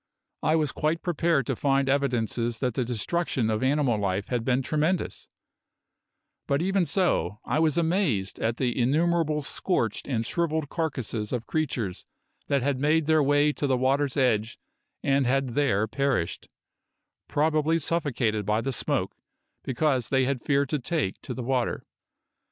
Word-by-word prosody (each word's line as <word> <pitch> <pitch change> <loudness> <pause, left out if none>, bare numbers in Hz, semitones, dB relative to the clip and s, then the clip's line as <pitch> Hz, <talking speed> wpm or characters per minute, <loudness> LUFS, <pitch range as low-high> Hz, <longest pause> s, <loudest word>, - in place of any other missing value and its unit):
I 155 - +2
was 155 -4 +1
quite 155 +2 -1
prepared 165 -5 +1
to 135 - -1
find 135 +1 +1
evidences 120 -4 0
that 125 0 -1
the 130 - 0
destruction 120 0 -1
of 110 - -1
animal 130 -4 +2
life 100 0 -1
had 120 -2 -1
been 130 +2 +1
tremendous; 155 +6 -1 1.2
but 140 - +1
even 190 0 +1
so 105 - 0
I - - 0
was 155 -1 +2
amazed 160 - 0
at 115 +1 -1
the 125 -3 0
innumerable 155 +4 +1
scorched 130 - -1
and 115 -4 -1
shrivelled 160 0 -1
carcasses 125 -10 -3
of 120 -2 -2
creatures 125 - -2 0.4
that 140 -3 +1
had 140 -1 0
made 155 +2 +2
their 160 0 +4
way 145 +1 +3
to 145 - -2
the 130 -2 +2
water's 135 +2 +1
edge 110 -4 +1 0.5
and 135 -2 +2
had 135 +1 +1
there 115 -5 +1
perished, 135 -7 -1 0.8
probably 155 +1 +2
suffocated 130 -10 0
by 105 +2 +1
the 135 +2 -2
smoke - - -1 0.5
because 130 -2 0
they 130 -2 +3
had 130 -2 -1
feared 140 -1 +1
to 150 - 0
take 145 - -2
to - - -6
the 125 - -4
water. 125 0 -1
135 Hz, 155 wpm, -26 LUFS, 120-155 Hz, 1.2 s, their